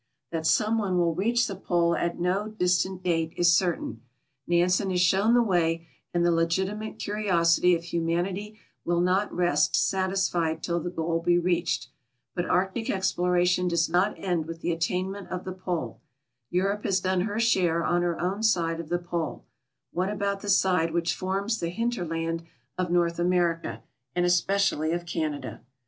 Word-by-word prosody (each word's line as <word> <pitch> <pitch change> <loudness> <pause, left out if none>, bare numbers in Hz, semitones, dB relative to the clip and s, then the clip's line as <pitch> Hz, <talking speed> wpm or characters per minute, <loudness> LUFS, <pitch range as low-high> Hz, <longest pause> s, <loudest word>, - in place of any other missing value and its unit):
That 160 -1 -1
some 220 +5 +2
one 190 -4 0
will 170 -1 +2
reach 235 +7 +1
the 195 - -4
Pole 170 -2 +1
at 170 0 -2
no 185 +4 0
distant 185 -2 0
date 165 -2 0
is 175 -1 +5
certain; 170 - -1 0.5
Nansen 180 +3 +2
has 180 -1 0
shown 195 +6 +4
the 240 - +5
way, 165 -5 +1 0.3
and 175 0 +1
the 175 - +4
legitimate 190 +6 -1
curiosity 180 -4 +2
of 165 - -5
humanity 175 +5 -2 0.3
will 170 0 +1
not 185 +3 +1
rest 175 0 +2
satisfied 185 -4 0
till 170 0 0
the 175 - -4
goal 165 -1 -1
be 175 +1 +2
reached. 175 -7 0 0.4
But 175 -1 -2
Arctic 190 +5 0
exploration 180 -1 +1
does 170 -2 +1
not 180 +5 +2
end 175 -4 -1
with 165 0 -7
the 175 - 0
attainment 185 +4 -2
of 180 -1 -4
the 185 - -4
Pole. 180 -3 -4 0.5
Europe 195 +3 0
has 190 -1 +1
done 185 0 0
her 205 +3 -2
share 180 -7 +2
on 175 0 +2
her 175 -1 -1
own 190 +4 -1
side 170 -7 +1
of 165 -2 -7
the 175 - +1
Pole; 175 -2 -4 0.5
what 185 +2 -1
about 200 -1 -1
the 205 - -5
side 180 -4 +3
which 170 0 +1
forms 195 +4 -2
the 170 - -2
hinter 230 +2 -2
land 165 +1 -2 0.3
of 185 -1 -2
North 170 -1 +1
America, 175 -1 0 0.3
and 175 0 +2
especially 175 -3 +2
of 175 0 -3
Canada? 155 -6 -4
180 Hz, 170 wpm, -27 LUFS, 170-190 Hz, 0.5 s, is